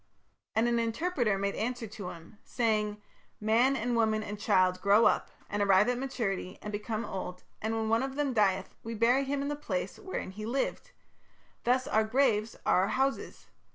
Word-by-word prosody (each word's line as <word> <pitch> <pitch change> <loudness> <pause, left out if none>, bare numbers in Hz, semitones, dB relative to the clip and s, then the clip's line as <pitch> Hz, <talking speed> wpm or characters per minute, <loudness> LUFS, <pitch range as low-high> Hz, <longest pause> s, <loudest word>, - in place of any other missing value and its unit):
And 225 +2 +3
an 235 0 +2
interpreter 230 - 0
made 200 0 -1
answer 245 +1 -2
to 200 -3 -7
him, 170 +5 -12
saying: 210 -3 0 0.4
'Man 230 +5 +3
and 240 0 -1
woman 220 -1 +2
and 205 -1 -6
child 185 -3 +2
grow 205 +3 +5
up, - - +2 0.2
and 205 0 -2
arrive 195 +1 +5
at 250 0 0
maturity, 210 -8 -3
and 210 - -6
become 215 +2 -3
old, 180 -1 -6 0.2
and 220 +1 -1
when 225 - -1
any 220 - -2
one 225 +1 +3
of 270 0 -3
them 285 -2 0
dieth 195 -4 +1
we 230 0 -5
bury 245 +5 +3
him 280 +1 -1
in - - -2
the 295 - -1
place 295 +12 -4
wherein 375 - -5
he 210 +3 -8
lived; 265 - -2 0.8
thus 255 +2 +2
our 220 - +3
graves 225 -2 +1
are 180 - +4
our 190 - +1
houses. 270 +4 -1
220 Hz, 190 wpm, -30 LUFS, 205-250 Hz, 0.8 s, grow